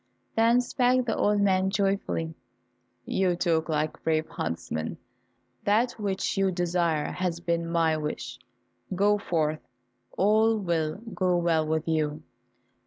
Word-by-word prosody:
Then 230 +2 +4
spake 250 0 +2
the 225 - 0
old 205 0 +2
man 190 -1 +3
joyfully, 195 -5 -1 0.7
"You 185 -2 +1
talk 165 -2 0
like 155 0 -1
brave 160 -1 0
huntsmen, 80 -1 -4 0.7
that 225 +4 +2
which 195 -2 -1
you 195 0 +3
desire 175 -3 0
has 175 -2 -2
been 170 -1 -1
my 165 -2 +2
wish; 150 -4 -5 0.6
go 205 +2 +3
forth, 155 -5 -1 0.6
all 220 +3 +4
will 165 -6 -1 0.2
go 180 -2 +1
well 165 -2 +1
with 160 +1 -1
you." 155 -1 -1
175 Hz, 125 wpm, -27 LUFS, 160-200 Hz, 0.7 s, Then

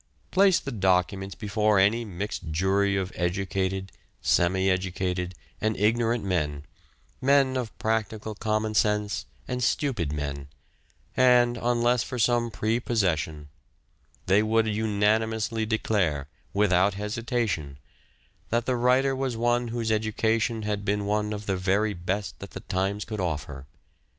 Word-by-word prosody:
Place 190 -1 +5
the 135 - -6
documents 95 -1 0
before 105 0 +1
any 105 +5 +3
mixed 95 -3 -5
jury 95 +5 +1
of 95 -1 -2
educated, 95 +1 -1 0.3
semi 95 +2 +2
educated, 95 -1 -1 0.3
and 110 0 0
ignorant 115 +2 +1
men, 75 -7 -1 0.6
men 135 0 +4
of 125 -4 -4
practical 110 -1 -2
common 110 0 -1
sense, 105 -1 +1 0.2
and 125 -1 -2
stupid 115 - 0
men, 70 -2 -4 0.7
and, 125 -1 +5
unless 120 0 +2
for 125 - -4
some 120 0 +2
prepossession, 100 -10 -1 0.8
they 100 +3 +4
would 110 +1 +2
unanimously 110 +1 0
declare, 95 - 0 0.2
without 100 -1 +3
hesitation, 105 - -2 0.7
that 120 0 0
the 130 - +1
writer 130 +3 +3
was 130 -3 -2
one 120 +1 +1
whose 115 -1 -2
education 110 +1 0
had 105 -1 -2
been 105 0 0 0.3
of 105 0 -5
the 95 -2 -1
very 100 +3 +1
best 90 -3 -3
that - - -8
the - - -8
times 95 +2 -2
could 110 -1 -5
offer. 75 -6 -4
105 Hz, 125 wpm, -26 LUFS, 95-115 Hz, 0.8 s, Place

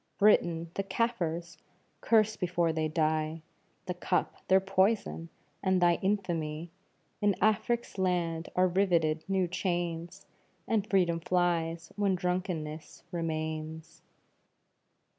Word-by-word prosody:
Britain! 170 -5 +3
"the 195 - -2
Kafirs" 175 -6 -2 0.4
curse 220 -1 +3
before 175 -3 0
they 155 -1 0
die, 155 0 0 0.4
The 180 - -2
cup 180 +1 0
their 190 0 +6
poison, 190 -3 +1 0.3
and 190 -1 +2
thy 175 -1 +4
infamy 170 -5 -1 0.5
In 205 -2 +3
Afric's 220 0 +1
land 175 -3 0
are 185 0 +4
riveted 170 -4 +2
new 190 -2 +1
chains, 175 -2 -3 0.4
And 215 -2 0
freedom 175 -4 +2
flies 170 -1 0
when 200 -2 +2
drunkenness 175 -4 -3
remains. 160 -1 -4
175 Hz, 105 wpm, -30 LUFS, 165-190 Hz, 0.5 s, their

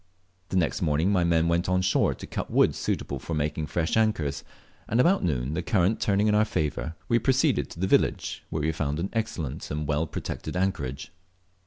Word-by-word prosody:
The 95 - 0
next 85 -3 +1
morning 80 +3 +2
my 90 -3 +3
men 85 -1 +2
went 85 +2 +1
on 90 0 +2
shore 90 - +2
to - - -9
cut - - -5
wood - - +4
suitable 70 - -3
for 80 +5 -4
making 75 +1 -1
fresh 80 0 -1
anchors, 80 -11 +1 0.5
and 115 - +1
about 180 +9 +4
noon, 65 -3 -1
the 90 - -1
current 95 +3 +1
turning 100 0 +2
in 105 - +3
our 105 +1 +5
favour, 80 -5 -2
we 115 - +3
proceeded 130 +2 +2
to - - -11
the 95 - +1
village, - - +1
where 80 -2 -2
we 80 - +2
found 75 -2 -2
an 95 +4 -3
excellent 110 - -3
and 75 0 -3
well 75 +2 0
protected 90 - -5
anchorage. 75 -8 -2
85 Hz, 200 wpm, -26 LUFS, 75-100 Hz, 0.5 s, our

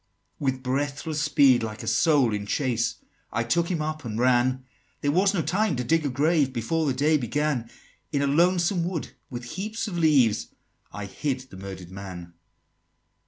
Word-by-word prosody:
XXX. - - -47
"With 130 -2 -1
breathless 145 +3 -2
speed, 140 -4 +5
like 110 -1 -5
a - - -7
soul 145 -9 +3
in 100 0 -3
chase, 120 -2 0 0.4
I 115 - 0
took 170 +8 +1
him 165 -4 -1
up 155 0 -4
and 110 -3 -4
ran; 125 +1 +2 0.4
There 145 - +1
was 195 +5 +3
no 170 - +1
time 190 +3 +1
to 125 - -2
dig 165 +5 +2
a - - -1
grave 145 +1 +2
Before 150 +7 -1
the 135 - +2
day 150 +4 +3
began: 135 -2 -1 0.4
In 140 -2 +1
a - - +2
lonesome 175 +4 +3
wood, 170 -2 -3 0.2
with 120 -1 -6
heaps 210 - -4
of 175 -4 -3
leaves, 135 -10 +3 0.4
I 105 -1 -6
hid 130 +6 -3
the 130 -7 -13
murder'd 95 -2 -8
man!" 90 -3 -8
140 Hz, 180 wpm, -26 LUFS, 120-160 Hz, 0.4 s, speed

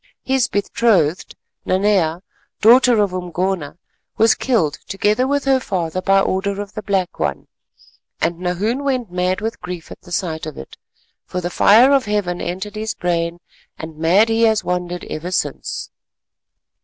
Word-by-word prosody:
His 265 -2 +1
betrothed, 195 -5 +1 0.3
Nanea, 185 -3 +1 0.4
daughter 235 -1 +6
of 195 -3 -2
Umgona, 180 -3 -3 0.4
was 225 0 +5
killed 180 - 0
together 210 +5 +1
with 285 0 0
her 270 -1 +3
father 185 -6 -2
by 195 +1 +3
order 195 +1 -1
of 205 0 -6
the 215 - -5
Black 190 -3 -1
One, - - -2 0.7
and 170 +1 -1
Nahoon 200 +9 -1
went 255 -7 -1
mad 180 +2 -1
with 225 +1 -4
grief 180 -2 -7
at - - -11
the 175 - -15
sight 160 -4 -2
of 155 - -8
it, 65 - -10 0.5
for 180 - -3
the 175 0 -4
fire 235 +10 +6
of 275 -2 +3
Heaven 205 -4 -1
entered 190 +4 -5
his 215 0 -3
brain, 170 -1 -2 0.4
and 160 0 -8
mad 175 +8 +3
he 225 0 +1
has 220 -2 +3
wandered 180 -1 -3
ever 160 +3 -5
since." 150 -6 -3
190 Hz, 155 wpm, -19 LUFS, 175-220 Hz, 0.7 s, daughter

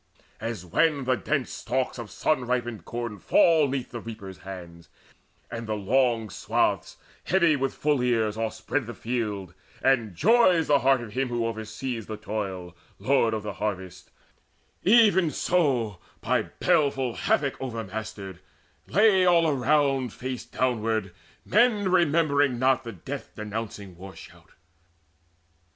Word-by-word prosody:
As 115 -6 -5
when 145 - +2
the 130 0 +2
dense 140 +1 -2
stalks 130 +1 -2
of 115 -3 -7
sun 130 -6 0
ripened 120 -6 -2
corn 120 -4 -5
Fall 160 - +4
'neath 135 -2 -3
the 120 - -5
reapers' 110 -5 -9
hands, 85 -4 -10 0.6
and 115 0 -5
the 110 - -1
long 115 +1 +1
swaths, - - -1 0.3
Heavy 170 -4 +3
with 135 -1 -2
full 145 -3 +1
ears, 115 -4 +1
overspread 115 +3 -2
the 120 - -7
field, 105 -5 -3 0.3
And 120 -8 +2
joys 185 - +4
the 145 -1 +4
heart 135 0 +3
of 115 -3 -8
him 130 +2 0
who 120 -1 -1
oversees 115 +1 -4
The 110 - -5
toil, 95 -5 -5 0.2
lord 125 -5 +2
of 110 - -4
the 105 -1 -4
harvest; 95 -2 -5 0.7
even 200 -5 +5
so, 130 - 0 0.2
By - - 0
baleful 140 -8 +2
havoc 140 +3 0
overmastered, 110 -5 -6 0.5
lay 200 -1 +4
All 165 -4 +4
round 135 -2 +1
face 130 -1 -5
downward 110 -6 -1 0.3
men 210 -4 +3
remembering 145 -6 +3
not 130 +1 +2
The 115 - -6
death 90 - -8
denouncing 105 -3 -6
war 95 +2 -11
shout. - - -15
120 Hz, 135 wpm, -26 LUFS, 105-140 Hz, 0.7 s, even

